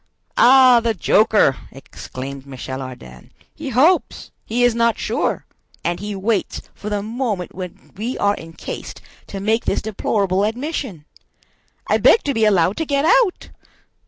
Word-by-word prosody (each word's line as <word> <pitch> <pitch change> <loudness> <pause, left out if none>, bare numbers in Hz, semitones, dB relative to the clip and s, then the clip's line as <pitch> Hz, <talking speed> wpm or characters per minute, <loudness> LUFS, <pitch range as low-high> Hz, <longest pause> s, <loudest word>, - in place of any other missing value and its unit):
"Ah, 255 -1 +7
the 230 -1 -1
joker!" 210 -6 +3
exclaimed 135 0 -9
Michel 130 0 -6
Ardan. 65 - -11 0.2
"He 305 -3 -7
hopes!—He 255 -4 0
is 245 -1 +4
not 235 0 +1
sure!—and 175 0 -4
he 205 +1 -5
waits 205 +2 -1
for 210 - -7
the 205 -1 -2
moment 220 -5 -3
when 180 -1 -9
we 230 +6 -4
are 205 0 +2
encased 165 0 -8 0.3
to 195 - -6
make 220 +4 0
this - - 0
deplorable 200 -2 0
admission! 235 - -3 0.8
I - - +2
beg 450 - +5
to 280 - -1
be 225 -2 +2
allowed 190 -2 +2
to 320 - -1
get 280 0 +1
out!" 475 -2 +2
210 Hz, 140 wpm, -20 LUFS, 180-245 Hz, 0.8 s, Ah